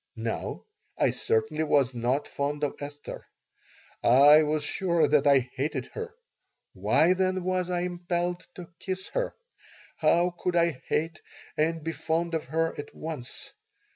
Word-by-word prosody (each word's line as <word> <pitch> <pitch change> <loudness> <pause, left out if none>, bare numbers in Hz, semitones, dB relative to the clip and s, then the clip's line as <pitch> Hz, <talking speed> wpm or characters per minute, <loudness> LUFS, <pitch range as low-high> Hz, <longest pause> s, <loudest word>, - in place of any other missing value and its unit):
Now, 115 0 -4 0.3
I - - +3
certainly 150 +7 0
was 140 -4 +2
not 125 +4 0
fond 145 +1 -3
of 145 - 0
Esther. 145 0 -8 0.8
I 145 +5 +8
was 155 0 0
sure 170 +2 +1
that 145 -1 +3
I 130 -3 +4
hated 140 +4 -2
her. 460 0 -6 0.6
Why, 170 +3 +3
then, 185 0 0
was 185 0 0
I 175 -1 0
impelled 175 0 -2
to 180 -1 -10
kiss 190 0 -4
her? - - -2 0.6
How 170 +3 +3
could 180 -1 -1
I 170 -5 +2
hate 165 +2 -1 0.3
and 160 +1 0
be 165 - -2
fond 170 +1 -1
of 160 - -1
her 165 +4 0
at 145 - -8
once? 155 -6 -6
160 Hz, 145 wpm, -28 LUFS, 145-175 Hz, 0.8 s, I